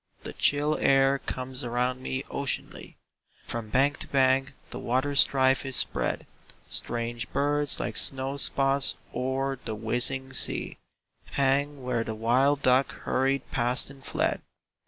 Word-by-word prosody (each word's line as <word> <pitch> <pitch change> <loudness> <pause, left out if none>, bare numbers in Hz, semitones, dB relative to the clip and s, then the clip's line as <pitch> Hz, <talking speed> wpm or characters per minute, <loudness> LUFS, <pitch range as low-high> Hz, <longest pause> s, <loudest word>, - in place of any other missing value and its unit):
The - - -7
chill 145 +1 +2
air 135 0 +3
comes 130 +1 -4
around 125 +1 -1
me 130 +1 -3
oceanly, 140 -2 -3 0.5
From 115 -2 -5
bank 140 +5 +2
to - - -4
bank 135 0 +2 0.2
the - - -6
waterstrife 130 +1 +3
is 135 -2 +1
spread; - - +1 0.5
Strange 115 0 -3
birds 145 0 0
like - - -3
snowspots 135 0 +2 0.2
oer 135 +1 -2
the 110 - -4
whizzing 130 +4 +1
sea - - -2 0.5
Hang 140 0 0
where 125 -2 -1
the 110 - -5
wild 130 +6 +2
duck 130 +2 +3
hurried 135 +1 0
past 125 +3 0
and 135 -1 -16
fled. - - -1
130 Hz, 130 wpm, -27 LUFS, 125-140 Hz, 0.5 s, air